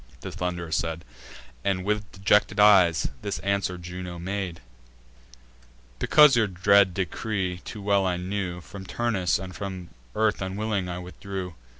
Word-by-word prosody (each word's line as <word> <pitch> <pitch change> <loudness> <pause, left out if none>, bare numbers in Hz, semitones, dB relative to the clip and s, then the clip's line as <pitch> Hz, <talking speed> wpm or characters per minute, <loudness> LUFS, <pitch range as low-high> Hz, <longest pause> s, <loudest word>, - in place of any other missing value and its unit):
The - - -6
Thund'rer 90 -2 -4
said; 80 +1 -2 0.6
And, 95 -2 0
with 105 0 -1
dejected 100 +2 +2
eyes, 95 -6 +5
this 100 - -3
answer 100 -2 -1
Juno 90 0 -7
made: 90 -1 -4 1.4
"Because 150 -3 +6
your 115 -3 +3
dread 95 0 +4
decree 95 0 -2
too 105 - -7
well 100 -1 +2
I 90 -1 0
knew, 90 -1 -3
From 95 +4 -10
Turnus 100 -3 0
and 95 0 -8
from 95 -3 -6 0.3
earth 110 -2 +1
unwilling 95 0 -2
I 90 - -4
withdrew. 90 +1 -6
95 Hz, 135 wpm, -26 LUFS, 90-100 Hz, 1.4 s, Because